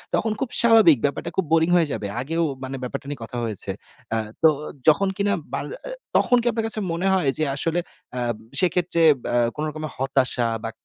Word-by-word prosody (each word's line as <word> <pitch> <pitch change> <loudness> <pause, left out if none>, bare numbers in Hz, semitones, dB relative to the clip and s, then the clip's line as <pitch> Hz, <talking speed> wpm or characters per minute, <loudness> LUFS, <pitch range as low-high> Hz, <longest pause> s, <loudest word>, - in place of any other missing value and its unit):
তখন 220 - 0
খুব 265 - -2
স্বাভাবিক 220 - +6
ব্যাপারটা 140 - -2
খুব 190 - +1
boring 165 +1 +4
হয়ে 170 -3 +4
যাবে। 100 - -3
আগেও, 165 +5 -1 0.2
মানে 130 +1 -4
ব্যাপারটা 125 - -5
নিয়ে 145 -4 -6
কথা 120 +2 -7
হয়েছে। 110 -4 -3 0.4
আ - - +1 0.3
তো 160 - +9 0.4
যখন 165 +6 +5
কিনা, 200 0 +1 0.2
বা - - 0 0.3
আ - - -5 0.3
তখন 245 - +4
কি - - -9
আপনার 225 0 -2
কাছে 220 - -2
মনে 170 +3 -1
হয় 180 -7 +2
যে, 155 - 0
আসলে 165 +4 0 0.4
আ - - -1 0.4
সেক্ষেত্রে 180 -2 +1 0.2
বা - - -3 0.2
কোনো 150 - -2
রকমের 155 -1 -6
হতাশা 130 -3 +1 0.2
বা 115 - -2
165 Hz, 195 wpm, -23 LUFS, 135-190 Hz, 0.4 s, তো